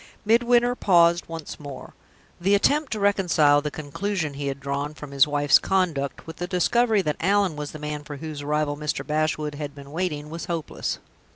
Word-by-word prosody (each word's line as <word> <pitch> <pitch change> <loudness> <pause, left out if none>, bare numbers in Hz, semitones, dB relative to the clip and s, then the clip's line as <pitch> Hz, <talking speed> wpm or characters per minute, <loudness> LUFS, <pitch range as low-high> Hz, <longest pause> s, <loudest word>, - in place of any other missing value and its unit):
Midwinter 240 +2 +4
paused 170 -6 +3
once 165 -2 -7
more. 140 -3 -9 0.5
The 195 +3 +3
attempt 290 +8 +2
to 215 - -3
reconcile 175 -8 +3
the 150 - -2
conclusion 155 +2 -3
he 140 0 -4
had 140 0 -3
drawn 140 +2 -3
from 150 -2 -9
his 140 +1 +4
wife's 145 -1 +4
conduct 165 -8 -1
with 160 -1 -9
the 175 - -3
discovery 215 +3 +2
that 150 -3 -1
Allan 195 -1 +2
was 150 -1 -5
the - - -8
man 150 0 -5
for 145 -1 -8
whose 155 0 -6
arrival 150 0 0
Mr. 150 0 -3
Bashwood 155 -1 -1
had 145 -1 -6
been 140 0 -11
waiting 155 -3 -3
was 165 +1 -5
hopeless. 165 -3 -3
155 Hz, 185 wpm, -24 LUFS, 145-185 Hz, 0.5 s, Midwinter